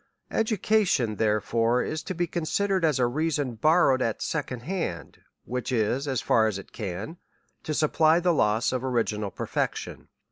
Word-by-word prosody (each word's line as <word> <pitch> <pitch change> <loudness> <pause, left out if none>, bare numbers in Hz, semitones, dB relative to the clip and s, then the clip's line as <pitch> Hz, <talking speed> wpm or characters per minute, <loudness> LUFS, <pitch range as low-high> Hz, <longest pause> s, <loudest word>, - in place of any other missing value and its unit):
Education, 210 - +1
therefore, 115 +3 +1
is 155 0 -3
to 185 - -5
be 175 +1 0
considered 180 +3 -1
as 150 -5 +2
reason 140 +1 0
borrowed 145 +1 +3
at 115 -3 -1
second 130 -6 -3
hand, 160 - -4 0.3
which 125 +1 -3
is, 125 +4 0
as 130 -4 -1
far 110 -1 +3
as 105 -3 -2
it 100 - -11
can, 105 - -5 0.4
to 155 - -3
supply 155 +2 +3
the 175 0 +2
loss 110 -5 +2
of 130 -1 -2
original 110 -5 -1
perfection. - - -4
130 Hz, 150 wpm, -26 LUFS, 115-165 Hz, 0.4 s, borrowed